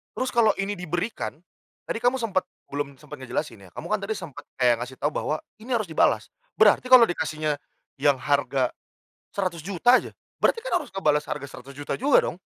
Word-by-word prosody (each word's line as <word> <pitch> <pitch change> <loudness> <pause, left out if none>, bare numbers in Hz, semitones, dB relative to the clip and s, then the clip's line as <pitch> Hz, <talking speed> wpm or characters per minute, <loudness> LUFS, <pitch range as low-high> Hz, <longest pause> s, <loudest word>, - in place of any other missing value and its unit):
Terus 255 0 -1
kalau 225 -3 +4
ini 195 -1 -3
diberikan, 180 +5 -3 0.5
tadi 225 - -3
kamu 245 +2 +3
sempet, 220 -7 -1 0.2
belum 140 -1 -3
sempet 150 0 -11
ngejelasin 115 -6 -4
ya. - - -17
Kamu - - -6
kan 215 - +2
tadi 205 +2 -3
sempet 165 -9 -9
kayak 120 -2 +3
ngasih 125 +2 -6
tahu 145 - -1
bahwa 155 - -1 0.2
ini 240 +3 -2
harus 215 -8 -2
dibalas. - - +2 0.2
Berarti 255 - +5
kalau 255 -2 +9
dikasihnya 155 -5 -1 0.4
yang 145 -1 +4
harga 135 -1 +1 0.6
Rp100.000.000 190 +5 +2
aja, - - -3 0.2
berarti 460 - +2
kan - - 0
harus 300 - -3
ngebalas 150 -6 +2
harga 140 -1 -4
Rp100.000.000 140 +2 -6
juga 275 +3 +5
dong? - - -5
170 Hz, 180 wpm, -25 LUFS, 140-220 Hz, 0.6 s, kalau